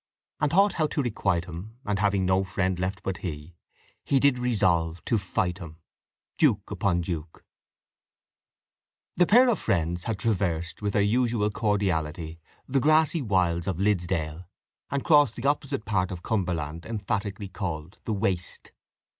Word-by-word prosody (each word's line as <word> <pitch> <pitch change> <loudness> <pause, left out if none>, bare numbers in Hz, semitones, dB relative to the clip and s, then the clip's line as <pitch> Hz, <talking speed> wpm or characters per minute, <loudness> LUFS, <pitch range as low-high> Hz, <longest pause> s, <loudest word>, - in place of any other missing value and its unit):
And 150 - +2
thought 195 +6 +4
how 155 -2 +1
to 145 - -1
requite 95 -7 0
him, 90 +7 -9
And 105 -2 -1
having 100 -2 +2
no 95 +1 +3
friend 95 -1 -1
left 95 +2 -3
but 95 -2 -2
he, 75 -1 -6 0.5
He 135 - +2
did 140 -2 +3
resolve 90 -9 +1
to 115 - +1
fight 90 -1 -1
him. 80 -3 -9 0.6
Duke - - +2
upon 90 -3 +1
Duke 80 -2 -6 1.7
The 180 - +4
pair 245 +4 +6
of 240 - +2
friends 85 0 -1
had 115 -3 -1
traversed 90 -6 -1
with 100 -1 -1
their 100 - +3
usual 115 -1 +1
cordiality 85 -7 -1 0.3
the 135 +1 +2
grassy 155 +3 +3
wilds 90 -6 +1
of 95 -4 -1
Liddesdale, 90 -4 0 0.4
and 140 0 -2
crossed 145 -5 +5
the 125 +3 -2
opposite 140 -6 -1
part 95 -4 0
of 90 -2 -7
Cumberland, 85 -6 -2
emphatically 100 -2 -3
called 90 -2 -5
The 110 - -1
Waste. 95 -4 -2
95 Hz, 150 wpm, -27 LUFS, 85-115 Hz, 1.7 s, pair